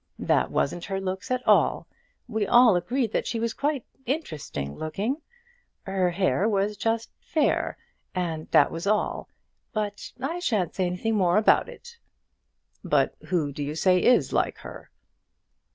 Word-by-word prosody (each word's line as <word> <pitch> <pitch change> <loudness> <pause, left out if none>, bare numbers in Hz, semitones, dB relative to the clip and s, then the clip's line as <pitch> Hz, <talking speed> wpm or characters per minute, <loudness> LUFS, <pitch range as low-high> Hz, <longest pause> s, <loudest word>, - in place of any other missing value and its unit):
That - - +1
wasn't 175 +5 -1
her 195 -1 -3
looks 190 0 -4
at 255 0 -2
all. - - +4 0.4
We 220 -3 -1
all 240 -4 +6
agreed 225 +6 0
that - - -1
she 230 - -2
was 230 0 -1
quite 285 -3 -1 0.2
interesting 155 - -4
looking. 210 - -3 0.6
Her 190 -2 0
hair 190 +3 +1
was 205 0 0
just 225 +1 -1
fair, 310 -2 0 0.4
and 165 -4 -3
that 145 - +5
was 165 +4 -5
all. 210 +1 0 0.4
But 210 -2 -3
I 305 +7 -3
shan't 215 - 0
say 185 -2 0
anything 180 +5 -1
more 185 -2 +3
about 215 - +4
it." 475 -1 -13 0.8
"But - - +2
who 165 -6 0
do 145 - -7
you 145 +1 -3
say 180 +2 +3
is 250 - +3
like - - +1
her?" - - -11
200 Hz, 150 wpm, -26 LUFS, 175-235 Hz, 0.8 s, all